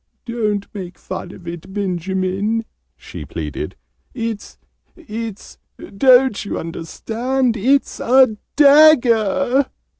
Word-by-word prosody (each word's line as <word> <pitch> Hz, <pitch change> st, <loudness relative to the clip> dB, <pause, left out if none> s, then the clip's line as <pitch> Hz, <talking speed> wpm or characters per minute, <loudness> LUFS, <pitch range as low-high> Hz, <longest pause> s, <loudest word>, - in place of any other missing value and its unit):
"Don't 215 Hz, -4 st, -2 dB
make 185 Hz, -4 st, -8 dB
fun -, -, -7 dB
of 175 Hz, -, -14 dB
it, 175 Hz, +2 st, -8 dB
Benjamin!" 190 Hz, +3 st, -2 dB, 0.3 s
she -, -, -9 dB
pleaded. -, -, -6 dB, 0.4 s
"It's 230 Hz, -4 st, -5 dB, 0.4 s
it's 225 Hz, -, -8 dB, 0.4 s
don't 255 Hz, 0 st, +4 dB
you 205 Hz, -, -4 dB
understand? 230 Hz, +10 st, -2 dB
It's 260 Hz, +6 st, +1 dB
a 255 Hz, -2 st, +4 dB, 0.2 s
DAGGER!" 270 Hz, -4 st, +5 dB
225 Hz, 95 wpm, -19 LUFS, 195-260 Hz, 0.4 s, DAGGER